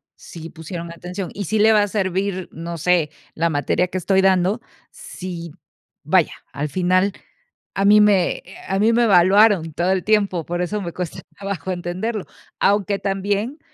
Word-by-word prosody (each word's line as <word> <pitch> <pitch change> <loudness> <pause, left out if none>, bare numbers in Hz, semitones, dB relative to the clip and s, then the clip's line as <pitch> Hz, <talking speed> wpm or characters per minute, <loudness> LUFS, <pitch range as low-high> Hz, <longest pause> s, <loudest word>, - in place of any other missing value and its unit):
sí 165 -1 -10
pusieron 170 +1 -7
atención? 180 +2 -6
Y 200 -1 -4
sí 220 - 0
le 220 +1 +6
va 210 -1 +5
a - - -1
servir, 190 -1 -2
no 170 +1 -6
sé, 165 -2 +2 0.2
la 170 +1 +1
materia 145 +4 0
que 185 - -4
estoy 190 +2 +2
dando 190 +3 +2 0.3
si, 180 - -8 0.5
vaya, - - +2 0.2
al 145 +1 -3
final 185 +3 +1 0.6
a 195 - +1
mí 210 +1 +7
me, 200 -4 +4
eh, - - -23 0.2
a 195 +1 0
mí 225 +2 +4
me 240 - +3
evaluaron 190 -3 +5
todo 175 +4 0
el 190 -1 0
tiempo, 200 -6 +1
por 175 +1 -3
eso 205 +4 -2
me 170 -2 -5
cuesta 180 -3 -5 0.2
trabajo 195 -3 -4
entenderlo. 185 +5 -3 0.3
Aunque 200 0 +2
también, 205 - -2
185 Hz, 170 wpm, -21 LUFS, 175-205 Hz, 0.6 s, mí